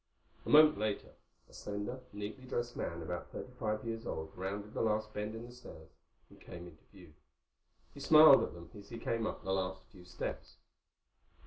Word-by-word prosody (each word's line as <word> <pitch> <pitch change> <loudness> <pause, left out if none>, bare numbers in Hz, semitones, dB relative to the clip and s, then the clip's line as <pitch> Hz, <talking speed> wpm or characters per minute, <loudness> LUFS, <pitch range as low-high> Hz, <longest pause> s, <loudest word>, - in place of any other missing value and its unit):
A - - -3
moment 155 0 +7
later 105 -1 -2 0.4
a - - -21
slender, 105 +5 -5
neatly 105 +5 -6
dressed 120 -1 -2
man 85 0 -4
about 90 +2 -5
thirty 125 - -7
five 110 -1 -1
years 115 0 -4
old 80 0 -4
rounded 100 +3 -5
the - - -1
last 110 -1 0
bend 105 +1 -3
in 115 +1 -7
the 120 - -11
stairs 120 -10 -13 0.4
and - - -18
came 85 0 -9
into 80 -3 -16
view. 90 -6 -15 0.8
He - - -11
smiled 155 0 +9
at - - -3
them 85 -1 -11
as 100 -1 -12
he 115 - -6
came 115 -1 -1
up - - -5
the 95 - -1
last 95 0 -2
few 90 -4 -15
steps. 90 - -6
105 Hz, 190 wpm, -34 LUFS, 95-120 Hz, 0.8 s, smiled